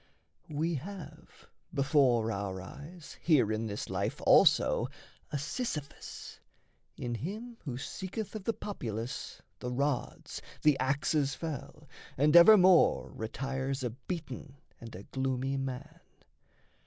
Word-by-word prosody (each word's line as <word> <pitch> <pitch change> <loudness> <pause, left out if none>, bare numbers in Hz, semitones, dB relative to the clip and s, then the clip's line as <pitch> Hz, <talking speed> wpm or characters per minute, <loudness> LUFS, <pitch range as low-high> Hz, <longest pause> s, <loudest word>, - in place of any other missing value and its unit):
We 160 +3 0
have 195 0 -10 0.3
before 135 -5 +3
our 100 -2 -3
eyes 145 - -10
Here 140 -10 +4
in 110 +1 -1
this 105 -1 -4
life - - -2
also - - +5 0.4
a 145 - 0
Sisyphus 150 - -5 0.6
In 120 -1 -3
him 215 - -5
who 125 -4 -3
seeketh 190 - -5
of 215 -3 -6
the 230 - +1
populace 120 - -5 0.2
The 125 - -4
rods, 140 +1 -2 0.2
the 150 -2 +6
axes 140 +1 +1
fell, 150 -1 -6 0.3
and 150 +4 +4
evermore 185 0 +7
Retires 135 +4 -3
a 120 - -1
beaten 140 0 -7 0.2
and 115 0 -9
a 95 - -8
gloomy 130 +1 -1
man. 135 -2 -5
140 Hz, 115 wpm, -31 LUFS, 125-165 Hz, 0.6 s, evermore